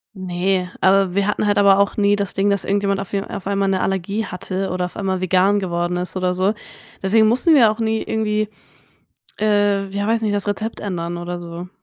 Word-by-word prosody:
Ne, 185 0 -1
aber 190 -1 +3
wir 200 +1 +1
hatten 210 - 0
halt 205 -1 +2
aber 200 -1 +6
auch 200 0 +2
nie 205 -1 +3
das 200 -2 -3
Ding, 200 +1 +1
dass 200 -1 0
irgendjemand 200 0 0
auf 195 - -7
w 200 - 0
auf 200 -1 -7
einmal 200 0 0
'ne 190 -1 +1
Allergie 195 +3 -1
hatte 190 +1 -4
oder 180 0 -1
auf 180 - -9
einmal 190 -2 -2
vegan 185 +2 +3
geworden 175 -2 -2
ist 180 0 -3
oder 185 -1 0
so. 190 +3 +1 0.5
Deswegen 215 +3 +4
mussten 255 +9 +3
wir 235 -7 +6
auch 215 - -6
nie 220 -1 0
irgendwie, 215 -1 -1 0.9
äh, 205 -2 +2
ja 200 +1 -3
weiß 225 0 +1
nicht, 210 -2 0
das 205 0 -2
Rezept 215 +2 -3
ändern 175 -3 -4
oder 175 0 -5
so. 170 +1 -8
195 Hz, 215 wpm, -20 LUFS, 185-205 Hz, 0.9 s, aber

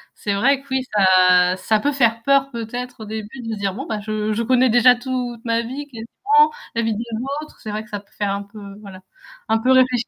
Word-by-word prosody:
c'est 205 - -3
vrai 265 +7 +2
que - - -23
oui, 265 0 +1
ça 185 -2 +5
ça 215 +2 +1
peut 290 +6 0
faire 230 -4 +1
peur 275 0 +3
peut-être 245 0 -6
au - - -6
début 220 +4 -7
de 225 -1 -4
se 210 - -6
dire: 195 -2 -1
«Bon 270 +5 -6
ben 215 -2 -4
je, 215 0 -2
je 230 - -1
connais 255 +1 +3
déjà 245 +1 +6
toute 245 -2 -5
ma 230 0 +1
vie, 265 +5 -6
quelque 230 -2 -9
part, 445 +2 +5 0.2
la 230 - 0
vie 225 -2 -1
des 230 - -3 0.4
autres» 305 - -15
c'est 215 - -7
vrai 215 +1 -4
que 215 - -19
ça 205 - -3
peut 200 - -24
faire 205 -1 -1
un 200 - -3
peu 200 +1 -12 0.2
voilà, 190 -2 -11 0.5
un 225 0 +2
peu 255 +3 +1
réfléchir 255 -2 +3
230 Hz, 250 wpm, -20 LUFS, 210-255 Hz, 0.5 s, déjà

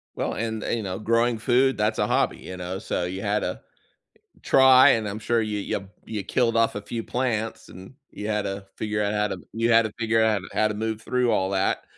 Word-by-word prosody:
Well, - - -2
and 110 -1 -3
and 115 - -1
you 110 - -4
know, 95 -1 -4
growing 115 +1 +1
food, 130 +3 +2
that's 105 +1 0
a - - +2
hobby, - - +1
you 95 - -9
know? 90 +2 -5
So, 90 - -2
you 95 +2 -5
had 105 0 0
to 90 - -4 0.8
try, 130 +1 +7
and 110 -4 +1
I'm 105 +2 -5
sure 115 +1 0
you 105 -1 -2
you 100 -1 -4 0.2
you 105 -3 -4
killed 115 +3 +1
off 115 -2 +2
a 105 - -4
few 115 +2 -5
plants, 115 -3 -2
and 95 +7 -12 0.2
you 105 +1 -6
had 105 -1 0
to 100 0 -5
figure 105 -1 -2
out 100 0 0
how 105 0 +1
to 95 - -5
you 115 +1 +1
had 115 0 +6
to 110 - -4
figure 115 0 +2
out 105 -4 +2
how 110 0 +2
to 105 - -4
move 110 0 -3
through 125 -1 +1
all 95 0 +1
that, 95 0 0
110 Hz, 235 wpm, -25 LUFS, 100-115 Hz, 0.8 s, try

